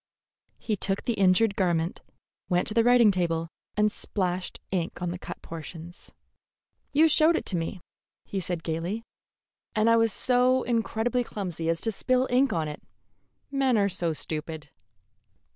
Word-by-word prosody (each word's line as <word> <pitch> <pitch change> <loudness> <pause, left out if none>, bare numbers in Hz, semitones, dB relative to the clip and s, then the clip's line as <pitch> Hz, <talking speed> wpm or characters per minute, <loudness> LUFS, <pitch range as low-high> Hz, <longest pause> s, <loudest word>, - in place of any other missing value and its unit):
He 215 - -2
took 195 0 -1
the 240 - 0
injured 200 +1 +3
garment, 170 -3 0 0.5
went 180 -1 +1
to 215 - +3
the 230 0 +4
writing 240 -3 +6
table, 165 -3 -1 0.3
and 210 0 +3
splashed 185 -3 -2
ink 180 -3 -2
on 180 -1 -2
the 180 - -6
cut - - -8
portions. 165 +1 -9 0.8
"You 310 +3 +5
showed 315 +2 +4
it - - -2
to 190 - 0
me," 170 +2 -3 0.4
he 195 - -3
said 175 -2 -4
gayly, 170 +7 -3 0.7
"and 215 +1 +3
I 230 0 +6
was 225 -1 +3
so 250 +3 +2
incredibly 235 +1 0
clumsy 175 -7 -4
as 165 0 0
to 225 - 0
spill 255 +4 +1
ink 260 +2 +3
on 160 -2 -1
it. 150 - -7 0.7
Men 270 -4 +2
are 200 -1 +3
so 175 -3 -1
stupid." 155 -1 -6
195 Hz, 160 wpm, -27 LUFS, 170-230 Hz, 0.8 s, writing